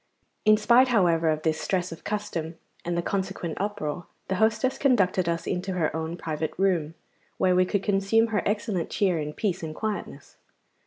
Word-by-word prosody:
In 215 Hz, 0 st, +6 dB
spite, 240 Hz, +4 st, +5 dB
however, 170 Hz, -8 st, +3 dB
of 155 Hz, 0 st, -1 dB
this 160 Hz, -1 st, 0 dB
stress 180 Hz, -2 st, -1 dB
of 165 Hz, -, -9 dB
custom 175 Hz, -6 st, -4 dB, 0.3 s
and 175 Hz, 0 st, -2 dB
the 170 Hz, -, 0 dB
consequent 190 Hz, -4 st, -3 dB
uproar, 180 Hz, -5 st, -3 dB, 0.2 s
the 190 Hz, -, 0 dB
hostess 220 Hz, +4 st, +1 dB
conducted 190 Hz, -9 st, +2 dB
us 170 Hz, 0 st, -2 dB
into 185 Hz, +1 st, -2 dB
her 160 Hz, -4 st, 0 dB
own 160 Hz, +1 st, -3 dB
private 155 Hz, -2 st, -3 dB
room, 170 Hz, -5 st, +1 dB, 0.4 s
where 185 Hz, -1 st, +3 dB
we 185 Hz, 0 st, +4 dB
could 195 Hz, +1 st, -1 dB
consume 205 Hz, +3 st, +2 dB
her 210 Hz, -4 st, +1 dB
excellent 205 Hz, -4 st, -1 dB
cheer 185 Hz, -5 st, +1 dB
in 150 Hz, 0 st, -3 dB
peace 185 Hz, +2 st, -2 dB
and 155 Hz, -1 st, -5 dB
quietness. 215 Hz, +2 st, -5 dB
185 Hz, 175 wpm, -26 LUFS, 165-210 Hz, 0.4 s, In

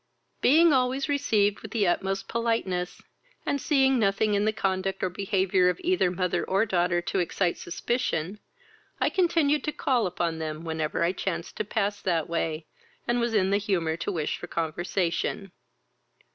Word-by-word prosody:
Being 320 Hz, +3 st, +6 dB
always 260 Hz, +2 st, +1 dB
received 215 Hz, -8 st, +1 dB
with 220 Hz, -, -8 dB
the 210 Hz, -3 st, +1 dB
utmost 195 Hz, +2 st, -1 dB
politeness, 225 Hz, -6 st, -2 dB, 0.4 s
and 280 Hz, -, -1 dB
seeing 270 Hz, -3 st, +3 dB
nothing 205 Hz, 0 st, +2 dB
in 205 Hz, +1 st, +2 dB
the 215 Hz, -, +3 dB
conduct 195 Hz, -2 st, -2 dB
or 185 Hz, -, 0 dB
behaviour 190 Hz, -1 st, +2 dB
of 180 Hz, -, -2 dB
either 360 Hz, -, +2 dB
mother 180 Hz, 0 st, -1 dB
or 195 Hz, +3 st, +1 dB
daughter 175 Hz, -3 st, +1 dB
to 190 Hz, -, -1 dB
excite 175 Hz, 0 st, 0 dB
suspicion, 190 Hz, -1 st, -2 dB, 0.6 s
I -, -, +2 dB
continued 325 Hz, -5 st, +2 dB
to 300 Hz, -, 0 dB
call 255 Hz, -7 st, +1 dB
upon 170 Hz, -2 st, -2 dB
them 155 Hz, 0 st, -4 dB
whenever 160 Hz, 0 st, -1 dB
I 170 Hz, -, +2 dB
chanced 185 Hz, -2 st, -4 dB
to -, -, 0 dB
pass 205 Hz, -1 st, -1 dB
that 165 Hz, -4 st, 0 dB
way, 165 Hz, -1 st, -2 dB, 0.4 s
and 240 Hz, 0 st, +1 dB
was 235 Hz, -1 st, 0 dB
in 190 Hz, -2 st, +2 dB
the 200 Hz, -, +4 dB
humour 175 Hz, -6 st, 0 dB
to 170 Hz, -, -3 dB
wish 155 Hz, -4 st, -2 dB
for 175 Hz, -, -7 dB
conversation. 175 Hz, +3 st, -2 dB
195 Hz, 165 wpm, -27 LUFS, 175-230 Hz, 0.6 s, Being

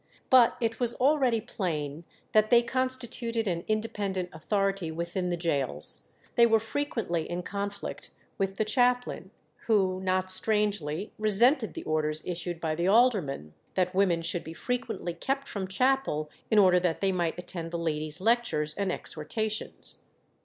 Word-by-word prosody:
But 250 Hz, -3 st, +6 dB
it 225 Hz, -2 st, -1 dB
was 240 Hz, -2 st, +1 dB
already 265 Hz, -4 st, +3 dB
plain 165 Hz, -7 st, -3 dB, 0.3 s
that 215 Hz, 0 st, +4 dB
they 240 Hz, 0 st, +6 dB
constituted 240 Hz, -2 st, -1 dB
an 170 Hz, -2 st, -1 dB
independent 205 Hz, -4 st, -1 dB
authority 195 Hz, +2 st, -1 dB
within 170 Hz, +3 st, -3 dB
the 175 Hz, -, -1 dB
gaols; 140 Hz, -, +1 dB, 0.3 s
they 235 Hz, 0 st, +6 dB
were 225 Hz, -1 st, +4 dB
frequently 225 Hz, -, -2 dB
in 175 Hz, +1 st, -3 dB
conflict 200 Hz, +2 st, -5 dB, 0.3 s
with 195 Hz, 0 st, 0 dB
the 215 Hz, -, +1 dB
chaplain, 245 Hz, +2 st, +1 dB, 0.4 s
who 190 Hz, -4 st, +2 dB
not 185 Hz, 0 st, 0 dB
strangely 205 Hz, -4 st, 0 dB
resented 220 Hz, -, +4 dB
the -, -, -5 dB
orders 155 Hz, 0 st, -1 dB
issued 175 Hz, -1 st, -3 dB
by 160 Hz, -2 st, -1 dB
the 170 Hz, +3 st, -1 dB
aldermen, 195 Hz, -, +2 dB, 0.2 s
that 180 Hz, 0 st, +1 dB
women 185 Hz, -3 st, +2 dB
should 170 Hz, +1 st, -1 dB
be 160 Hz, -, -8 dB
frequently 240 Hz, -7 st, -3 dB
kept 270 Hz, +11 st, -2 dB
from 195 Hz, -2 st, -4 dB
chapel 190 Hz, -, +1 dB, 0.2 s
in 220 Hz, -, +3 dB
order 185 Hz, -3 st, +6 dB
that 175 Hz, -2 st, 0 dB
they 195 Hz, -1 st, +2 dB
might 175 Hz, -3 st, -1 dB
attend 175 Hz, -2 st, -5 dB
the 170 Hz, -, -3 dB
ladies' 155 Hz, -1 st, -2 dB
lectures 205 Hz, -9 st, +1 dB
and 200 Hz, 0 st, -1 dB
exhortations. 215 Hz, +9 st, -4 dB
195 Hz, 150 wpm, -28 LUFS, 170-225 Hz, 0.4 s, But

